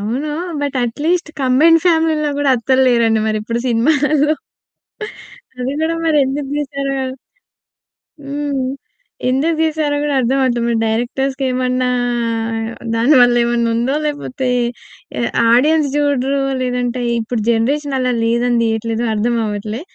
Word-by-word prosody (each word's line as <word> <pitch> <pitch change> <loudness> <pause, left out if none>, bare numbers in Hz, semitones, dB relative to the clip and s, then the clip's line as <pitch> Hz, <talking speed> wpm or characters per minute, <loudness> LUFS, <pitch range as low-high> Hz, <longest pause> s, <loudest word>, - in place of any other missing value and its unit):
అవును. 250 +9 -3 0.3
But 285 -2 -2
at least 310 +8 -1
combined 300 +6 +4
ఫ్యామిలీల్లో 320 -3 +2
కూడా 290 -1 +2
అత్తల్లేరండి 235 -3 +2
మరి 215 0 0
ఇప్పుడు 230 +2 -3
సినిమాలల్లో. 295 +5 +2 1.3
అది 255 +2 -2
కూడా 330 +1 0
మరి 315 -2 +2
ఎందుకు 270 +1 -3
తీసారో 275 -1 -3 1.3
హ్మ్. 285 -1 -2 0.7
ఎందుకు 290 +6 +1
తీసారో 310 -2 0
గూడా 295 -1 -1
అర్థం 255 +3 +1
అవ్వట్లే. 245 -2 +1
మరి 235 - +1
డైరెక్టర్స్‌కి 260 +5 -1
ఏమన్నా 255 0 0 1.1
దాని 240 +7 +4
వల్ల 245 0 +5
ఏమన్నుందో 235 +1 0
లేపోతే 280 -3 -3 0.7
ఎ - - 0 0.3
ఆడియన్స్ 300 +5 +4
చూడరో 280 -2 +1 0.2
లేదంటే 250 0 -2 0.2
ఇప్పుడు 225 0 -3
జనరేషన్ 275 +5 0
అలా 255 -1 +1
లేదని 235 +1 +1
దీయట్లేదో 225 +1 -1
అర్థం 230 +3 0
అవ్వట్లే. 210 +3 -4
260 Hz, 115 wpm, -17 LUFS, 235-290 Hz, 1.3 s, వల్ల